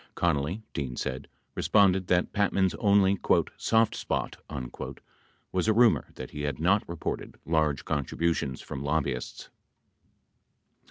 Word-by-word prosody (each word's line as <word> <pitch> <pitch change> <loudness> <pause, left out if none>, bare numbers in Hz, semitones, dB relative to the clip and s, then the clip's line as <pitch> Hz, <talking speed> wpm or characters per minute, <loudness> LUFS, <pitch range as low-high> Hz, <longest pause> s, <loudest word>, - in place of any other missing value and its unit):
Connally, 85 +5 0
Dean 65 -5 -3
said, 65 +2 -4 0.3
responded 95 +1 +3
that 90 0 +1
Patman's 100 -2 +2
only 100 -2 +4 0.4
"soft 115 -1 +2
spot" - - -2 1.2
was 95 +2 0
a 110 - +5
rumor 115 0 +4
that 65 - -8
he 75 - -6
had 75 0 -2
not 95 +6 +3
reported 85 -1 -4
large 80 -3 +1
contributions 75 -1 -1
from 65 - -6
lobbyists. 70 -4 -2
85 Hz, 115 wpm, -28 LUFS, 70-100 Hz, 1.2 s, a